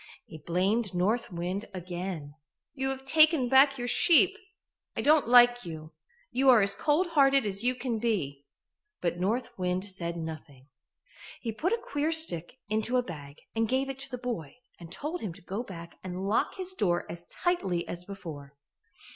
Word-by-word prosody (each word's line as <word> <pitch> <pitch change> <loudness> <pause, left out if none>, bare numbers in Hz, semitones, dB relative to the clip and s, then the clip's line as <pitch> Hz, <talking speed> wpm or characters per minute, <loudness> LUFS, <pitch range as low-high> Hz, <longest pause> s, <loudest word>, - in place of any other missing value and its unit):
He 160 - -11
blamed 185 +6 0
North 215 +6 0
Wind 180 +4 -3
again. 175 -4 -5 0.4
"You 265 -1 -2
have 265 0 -5
taken 310 -2 +5
back 275 +1 +6
your 245 -1 -3
sheep. 355 +9 +5 0.6
I - - +1
don't 300 -2 +4
like 245 0 +6
you. 155 -2 -8 0.4
You 265 +1 +3
are 235 -5 +7
as 200 0 +1
cold 310 - +1
hearted 275 -5 +4
as 200 +1 -2
you 250 +1 +2
can 245 -3 -2
be." 145 -12 -2 0.5
But 175 0 -2
North 235 +6 -1
Wind 180 +1 -1
said 170 -3 -5
nothing. 150 -4 -8 0.7
He 230 - -3
put 310 - -1
a 465 - +2
queer 290 +2 -1
stick 260 - +2
into 220 +4 0
a 250 - +2
bag 145 -7 -9
and 225 -1 +1
gave 265 +1 0
it 270 - -10
to 270 +1 -3
the 250 - -5
boy 235 - -5 0.2
and 170 -1 -11
told 310 - -4
him 195 -6 -4
to - - -14
go 195 +5 -4
back 170 -7 -10
and 185 +1 -4
lock 210 - +1
his 375 0 -3
door 180 - 0
as 170 0 -8
tightly 195 - -1
as 175 0 -5
before. 160 -8 -9
210 Hz, 180 wpm, -29 LUFS, 175-265 Hz, 0.7 s, are